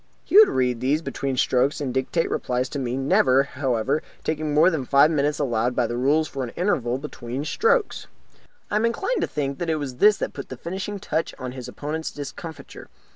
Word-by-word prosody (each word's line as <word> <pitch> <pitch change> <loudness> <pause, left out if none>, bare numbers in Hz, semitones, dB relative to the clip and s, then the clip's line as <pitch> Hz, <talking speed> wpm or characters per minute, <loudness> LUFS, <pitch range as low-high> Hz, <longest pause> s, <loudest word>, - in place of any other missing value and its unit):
He - - -4
would 430 -1 +9
read 125 -2 0
these 140 +6 0
between 140 -1 -3
the - - -9
strokes 130 +5 +2
and 135 -4 -3
dictate 130 +6 0
replies 125 +1 -1
to 140 - -4
me, 125 -1 -2
never, 135 0 +3
however, 135 0 -1 0.2
taking 155 -1 -2
more 155 +5 +5
than 160 -4 -1
the 125 - -8
five 140 +3 +5
minutes 150 -1 +1
allowed 120 -3 0
by 125 - +2
the 120 - -3
rules 145 +6 +2
for 135 -2 -4
an 125 - -4
interval 130 - 0
between 135 -1 -6
strokes. 455 - +1 0.6
I 205 - +2
am 220 - +2
inclined 390 - -1
to - - 0
think 140 -2 -3
that 175 - -2
it 160 - +2
was 140 -5 -5
this 210 +8 +5
that - - -3
put - - -8
the - - -7
finishing 190 +4 -5
touch 165 -3 -2
on 130 -1 -5
his 125 -1 -8
opponents' 155 +2 -4
discomfiture. 150 +3 -9
140 Hz, 215 wpm, -24 LUFS, 130-160 Hz, 0.6 s, would